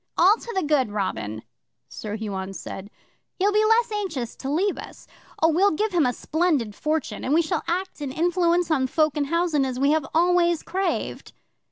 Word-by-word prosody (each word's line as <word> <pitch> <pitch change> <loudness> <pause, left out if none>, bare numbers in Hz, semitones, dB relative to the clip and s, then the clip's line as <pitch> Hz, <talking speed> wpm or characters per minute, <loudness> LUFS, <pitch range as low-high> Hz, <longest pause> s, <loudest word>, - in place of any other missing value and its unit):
'"All 380 +5 +6
to 470 - -8
the 380 - +1
good, 290 -6 +2
Robin," 110 - -3 0.4
Sir 210 -1 -6
Huon 195 -3 -4
said. 195 +1 -7 0.5
"He'll 395 +2 +2
be 425 +1 +3
the 430 - +3
less 460 +1 +3
anxious 340 - -3
to 270 - -5
leave 370 +8 0
us. - - -10 0.4
Oh, 325 - +6
we'll 365 +5 +4
give 420 +5 -1
him 330 -7 +3
a - - +2
splendid 295 -5 0
fortune, 305 +5 -2
and 280 - +1
we 335 - +4
shall 325 +1 -1
act 370 -1 -2
and 280 -2 -3
influence 345 +2 +1
on 265 -4 +2
folk 310 +1 +1
in 295 -1 0
housen 335 -1 +1
as 260 -2 -2
we 280 +2 +3
have 310 -3 +1
always 345 0 +3
craved." 380 +2 -3
315 Hz, 195 wpm, -24 LUFS, 260-360 Hz, 0.5 s, All